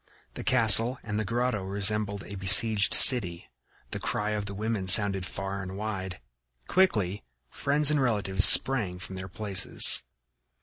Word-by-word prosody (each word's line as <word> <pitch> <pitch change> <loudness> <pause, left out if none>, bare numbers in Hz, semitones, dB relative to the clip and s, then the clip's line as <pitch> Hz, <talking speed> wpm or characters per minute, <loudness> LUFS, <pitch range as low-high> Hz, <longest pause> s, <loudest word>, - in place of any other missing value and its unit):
The - - -11
castle 120 0 +5
and 105 -1 -7
the - - -5
grotto 120 0 -5
resembled 100 +1 -3
a - - -13
besieged 100 +2 +2
city; 90 -10 +1 0.4
the - - -8
cry 105 +1 -5
of 105 -1 -7
the 100 - -9
women 105 -2 -7
sounded 95 -1 +5
far 95 0 -9
and 95 +1 -11
wide. 95 -5 -9 0.5
Quickly 105 - -3 0.3
friends 145 +1 0
and 150 -2 -3
relatives 100 -6 -3
sprang 110 -10 +2
from 95 +1 -12
their 95 0 -11
places. 95 +1 +2
105 Hz, 145 wpm, -23 LUFS, 95-115 Hz, 0.5 s, castle